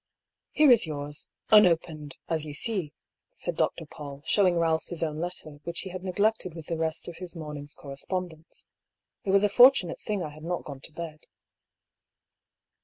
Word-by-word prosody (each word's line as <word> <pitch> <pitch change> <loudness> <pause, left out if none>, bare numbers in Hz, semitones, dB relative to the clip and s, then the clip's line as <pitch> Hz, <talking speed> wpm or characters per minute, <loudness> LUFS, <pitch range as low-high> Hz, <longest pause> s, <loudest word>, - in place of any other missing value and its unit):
" - - -62
Here 300 -3 +5
is 230 -7 +6
yours 145 -1 -4
— - - -26
unopened 165 -7 +4
— - - -55
^as 160 -2 0
you 150 -2 -7
see," 185 -4 -1 0.4
said - - -3
Dr. - - 0
Paull, 145 -1 -9
showing 185 -4 +4
Balph 165 -1 +1
his 170 -2 -2
own 155 -1 -2
letter, 160 -4 -5
which 170 0 -3
he 190 - -6
had 185 0 -6
neglected 195 -1 0
with 165 -2 -8
the 165 - -2
rest 160 -1 -2
of 175 - -7
his 180 0 -6
morning's 150 -2 -7
correspondence. 160 +3 -4 0.3
" - - -61
It - - -3
was 195 +1 +5
a - - +6
fortunate 225 -5 +6
thing 205 -4 -2
I 155 - -4
had 155 +1 -13
not 175 +1 -2
gone 140 -2 -8
to 150 - -8
bed." 155 -1 -8
165 Hz, 190 wpm, -28 LUFS, 150-185 Hz, 0.4 s, is